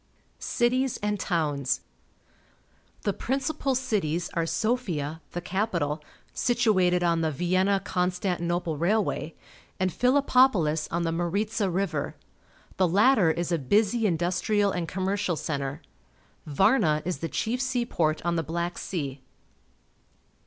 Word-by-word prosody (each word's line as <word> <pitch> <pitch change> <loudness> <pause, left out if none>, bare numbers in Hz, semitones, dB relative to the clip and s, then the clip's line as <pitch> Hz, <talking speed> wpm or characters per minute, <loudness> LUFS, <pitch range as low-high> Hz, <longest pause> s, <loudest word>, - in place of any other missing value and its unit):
Cities 255 +1 +1
and 210 -1 0
Towns. 150 -8 0 0.6
— - - -36
The 205 - 0
principal 275 +3 -1
cities 180 -9 -1
are 165 -1 0
Sofia, 170 - -1
the 175 - -3
capital, 170 -6 -1 0.3
situated 195 -8 +2
on 170 -1 +2
the 160 - +1
Vienna 185 +6 +1
Constantinople 180 -3 -1
railway, 180 -3 0 0.4
and 185 -2 0
Philippopolis 250 - +3
on 170 +1 -1
the 165 - 0
Maritza 200 +5 -1
River. 190 +3 -2 0.6
The 185 - +3
latter 205 +1 +4
is 170 +2 -1
a 170 - +1
busj' 210 - +2
industrial 195 +2 +1
and 175 -3 -2
commercial 190 0 -1
centre. 140 -3 -4 0.6
Varna 155 - +3
is 180 0 -2
the 165 - -3
chief 245 +3 -1
seaport 235 -13 0
on 170 0 +1
the - - +2
Black 170 +3 -3
Sea. 140 -7 -4
180 Hz, 120 wpm, -27 LUFS, 165-215 Hz, 0.6 s, latter